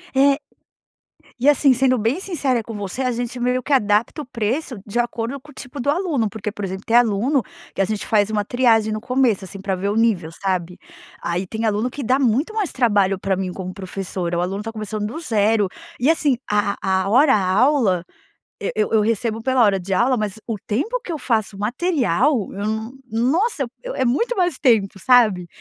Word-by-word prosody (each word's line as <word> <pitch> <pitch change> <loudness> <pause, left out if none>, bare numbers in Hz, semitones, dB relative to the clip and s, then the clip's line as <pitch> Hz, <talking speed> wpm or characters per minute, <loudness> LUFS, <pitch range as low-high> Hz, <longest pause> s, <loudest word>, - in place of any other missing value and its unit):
É. 275 +1 +4 1.0
E, 275 +5 +4
assim, 280 -2 +5
sendo 255 0 +2
bem 230 - 0
sincera 280 -11 -1
com 225 +1 -8
você, 205 +4 -4
a 255 -1 +1
gente 240 +1 -4
meio 250 +1 0
que 285 - -1
adapta 215 +4 +2
o - - -8
preço 250 +3 -2
de 220 +3 -2
acordo 240 +2 -2
com 295 - -15
o - - -17
tipo 270 +2 -9
do 265 - -1
aluno. 295 - 0
Porque, 215 -1 -5
por 205 - -7
exemplo, 190 0 -4
tem 230 - +1
aluno 240 +4 +3 0.3
que - - -1
a - - +3
gente 215 0 -3
faz 210 -1 +2
uma 210 -1 -1
triagem 225 -3 +2
no 215 - -4
começo, 250 -5 +1
assim, 190 +1 -9
pra 195 -1 -2
ver 195 +2 -2
o 205 - -1
nível, 210 -8 +1
sabe. 180 -1 -3 0.4
Aí 175 +2 -2
tem 220 +2 -3
aluno 215 +3 0
que 275 +2 -6
dá 255 +4 +2
muito 270 - +1
mais 420 -6 -1
trabalho 205 -6 +2
pra 195 0 0
mim 185 -1 -3
como 185 0 -6
professora. 185 -2 -4
O - - +1
aluno 190 +3 -2
está 225 +2 -5
começando 215 -1 -4
do 270 +9 -6
0. 215 - +2 0.3
E, 265 +6 +2
assim, 295 -6 +2
a 205 -1 +1
a 190 0 0
hora 265 +2 +5
aula 200 - +2 0.6
eu - - -1
eu 215 -1 +1
eu 220 - +5
recebo 225 +1 0
pela 260 -1 +3
hora 195 -3 +2
de 190 +2 -2
aula, 245 +4 +2
mas 210 -1 -3
o 225 -3 -2
tempo 430 - -1
que 370 - -9
eu 315 - -2
faço 220 -5 -1
o - - -11
material 250 - +1
eu 200 +1 -4
não 220 +2 -3 0.2
nossa, 280 - +1
eu 240 - -4
eu - - -5
é 260 - 0
muito 355 - +1
mais 355 -6 +1
tempo, 215 -7 +2
sabe. 215 -7 +4
225 Hz, 215 wpm, -21 LUFS, 200-260 Hz, 1.0 s, assim